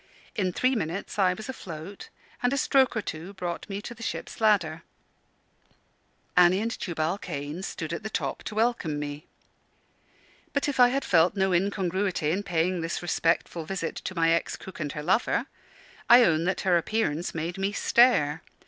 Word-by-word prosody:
In 185 -3 0
three 255 +8 +1
minutes 195 -2 -3
I 185 -2 +4
was 220 - -8
afloat, 190 -6 -8 0.3
and 245 - +2
a 275 - 0
stroke 265 -3 +3
or 220 - -1
two 170 +6 -6
brought 175 +1 -5
me 200 +1 -4
to - - -6
the 230 - -15
ship's 225 - -5
ladder. 180 -7 +2 1.5
Annie 180 +1 +6
and 225 +2 -1
Tubal 170 -3 -2
Cain 150 -1 -5
stood 165 -4 -5
at 170 - -4
the 220 - -5
top - - -3
to 215 - -5
welcome 220 -9 0
me. 145 +1 -6 1.3
But 280 -1 0
if 285 -3 -2
I 245 - +9
had 270 +3 -1
felt 170 +2 +4
no 190 -1 +1
incongruity 185 -3 0
in 190 +4 0
paying 175 -1 0
this 165 +1 -3
respectful 170 -1 0
visit 170 0 -3
to 185 - -6
my 165 -1 +3
ex 170 - 0
cook 190 - -11
and 150 -3 -3
her 150 - -5
lover, 190 +8 +1 0.6
I 240 +1 +9
own 165 -5 +2
that 190 +1 0
her 180 -2 +3
appearance 175 -5 -1
made 170 +4 -3
me 195 +1 0
stare. 205 - +3
185 Hz, 175 wpm, -27 LUFS, 165-210 Hz, 1.5 s, I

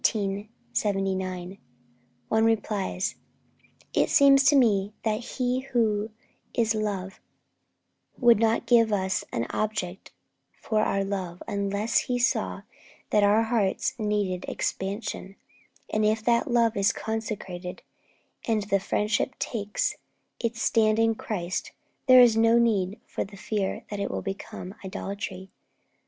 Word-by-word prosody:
One 195 -3 -2 0.9
replies: 210 -4 0 0.8
'It - - +2
seems 275 -1 +6
to 285 - +6
me 210 -6 +3
that 215 -1 0 0.2
He 250 -1 +1
who 225 -5 0 0.5
is 225 -2 +2
love 200 -3 -3 1.0
would 240 -3 +5
not 225 +1 +2
give 230 -2 +4
us 190 -2 0
an 115 - -1
object 210 -4 -3 0.5
for 215 -1 0
our 195 -2 +1
love 190 -3 -4
unless 200 +2 0
He 250 - -1
saw 245 +1 0 0.5
that 210 - +4
our 205 +2 +4
hearts 225 -4 0
needed 205 -4 -1
expansion; 195 0 -3 0.5
and 215 - 0
if 215 +1 +1
the 235 -1 +4
love 235 -2 +2
is 200 0 +3
consecrated, 200 -5 -5 0.6
and 220 -3 +1
the 195 - +4
friendship 210 +6 -1
takes 210 -3 -2 0.4
its 230 -1 -2
stand 215 -1 +3
in 225 0 +3
Christ, 185 -5 -4 0.3
there 255 -1 +9
is 240 -3 +6
no 230 +1 +5
need 210 -4 +1
for - - -3
the 195 0 -12
fear 200 -1 -2
that 205 - -4
it 200 - -1
will - - -4
become 195 -1 -6
idolatry. 190 0 -6
210 Hz, 125 wpm, -26 LUFS, 195-225 Hz, 1.0 s, there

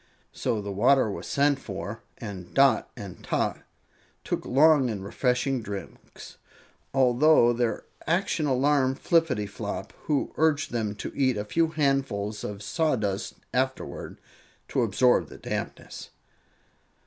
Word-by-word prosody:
So 105 -3 -2
the 100 - -4
water 120 +3 +3
was - - -6
sent 140 0 +2
for, 100 0 -6 0.2
and 95 -6 -8
Dot 135 -1 +4
and 100 -3 -9
Tot - - -1 0.6
took - - -3
long 145 0 +5
and 100 -4 -4
refreshing 125 +4 0
drinks, 100 -2 -9 0.5
although 130 0 +5
their 115 -2 -1 0.2
action 165 -2 +1
alarmed 135 0 +2
Flippityflop, 140 - 0
who 150 -2 0
urged 155 -1 +2
them 110 -3 -2
to - - -6
eat 130 -4 +2
a 105 - -3
few 165 +10 +2
handfuls 135 -9 -1
of 105 0 -5
sawdust 110 - -1 0.2
afterward 130 +1 -2 0.5
to 130 - +1
absorb 120 +3 +3
the - - -11
dampness. - - -6
125 Hz, 125 wpm, -27 LUFS, 105-140 Hz, 0.6 s, long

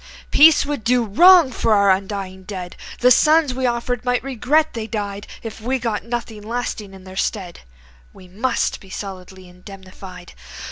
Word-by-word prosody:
Peace 310 0 +6
would 285 -5 -4
do 240 +1 +2
wrong 335 - +6
to - - -2
our 200 -2 +4
undying 190 -1 -3
dead, 185 -2 -8 0.3
The 250 +1 +5
sons 305 +1 +4
we 260 0 -1
offered 240 0 -2
might 245 -1 -1
regret 275 +4 0
they 225 -2 -5
died 205 -2 -5 0.2
If 225 -1 -8
we 255 +4 -1
got 230 -4 -3
nothing 230 -2 -5
lasting 215 -3 -5
in 190 - -14
their 185 0 -12
stead. 190 -3 -3 0.5
We 185 - -16
must 215 +8 -2
be 190 - -17
solidly 190 -1 -9
indemnified. 185 0 -13
220 Hz, 160 wpm, -20 LUFS, 190-250 Hz, 0.5 s, Peace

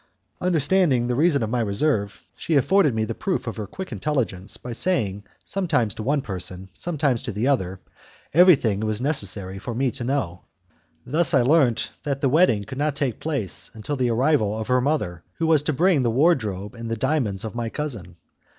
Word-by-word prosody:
Understanding 165 -6 +2
the 125 - 0
reason 145 -1 +3
of 110 - -3
my 125 - 0
reserve, 105 0 -1
she 160 - -2
afforded 150 - +3
me 110 0 0
the 115 - -3
proof 180 - -2
of 115 - -5
her 105 -2 -4
quick 190 - -7
intelligence 110 -5 -2
by 125 - -7
saying 105 - -1 0.2
sometimes 150 - 0
to - - -7
one 140 +4 0
person, 95 -1 -6
sometimes 145 - -1
to - - -4
the 110 +5 -1
other, 95 -9 0 0.5
everything 140 - +5
it - - -1
was 110 0 -1
necessary 100 - -1
for 115 +4 -5
me 130 +1 +1
to 130 - -6
know. 120 -10 -2 0.6
Thus 155 +4 +2
I 130 - +5
learnt 130 -4 +3
that 140 -2 -2
the 135 - +2
wedding 130 - +3
could 130 +7 -8
not 150 -1 0
take 135 -6 -2
place 140 - -2
until 110 +7 -4
the 125 -2 0
arrival 115 -3 +2
of 110 +1 -5
her 125 0 +3
mother, 125 - -1
who 165 - -1
was 160 -3 +4
to 150 - -1
bring 165 +1 +3
the 120 - +1
wardrobe 115 - +1
and 115 -1 -7
the 115 - -2
diamonds 125 -7 0
of 110 - -5
my 120 -1 -3
cousin. 130 - -5
125 Hz, 195 wpm, -23 LUFS, 105-150 Hz, 0.6 s, everything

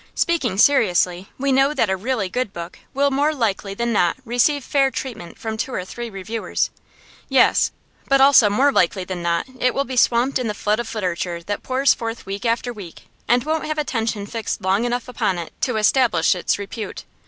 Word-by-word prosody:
Speaking 275 - 0
seriously, 190 -7 +3
we 275 +1 0
know 270 +3 +3
that 230 - +2
a - - +2
really 215 +1 -2
good 245 +3 -2
book 170 -2 -8
will 280 +1 +1
more 290 +3 +1
likely 205 -5 -1
than 235 +2 -1
not 175 -5 +2
receive 250 +4 +2
fair 275 0 +2
treatment 235 -11 -7
from 220 -1 -5
two 245 - -3
or 185 - -3
three 240 +4 -6
reviewers; 215 +3 -3 0.6
yes, - - +4 0.4
but 275 0 +4
also 265 -5 +7
more 265 +8 +3
likely 185 -4 +2
than 180 -1 -5
not 170 0 0
it 250 -1 +1
will 275 - +1
be 260 - -5
swamped 245 +2 +3
in 250 - -2
the 210 - -3
flood 210 +2 0
of 235 -1 -5
literature 175 -3 -3
that 205 +3 -4
pours 265 +2 +2
forth 230 0 -6
week 200 +5 -4
after 240 +1 -1
week, 195 -7 -11 0.2
and 245 0 +3
won't 315 +2 -1
have 310 0 -2
attention 225 -8 -2
fixed 220 -2 -4
long 195 +5 +1
enough 245 0 -2
upon 195 -6 -1
it 170 -1 -6
to 250 -4 0
establish 215 -6 +3
its 180 - -1
repute. 205 +2 -7
230 Hz, 200 wpm, -21 LUFS, 195-260 Hz, 0.6 s, also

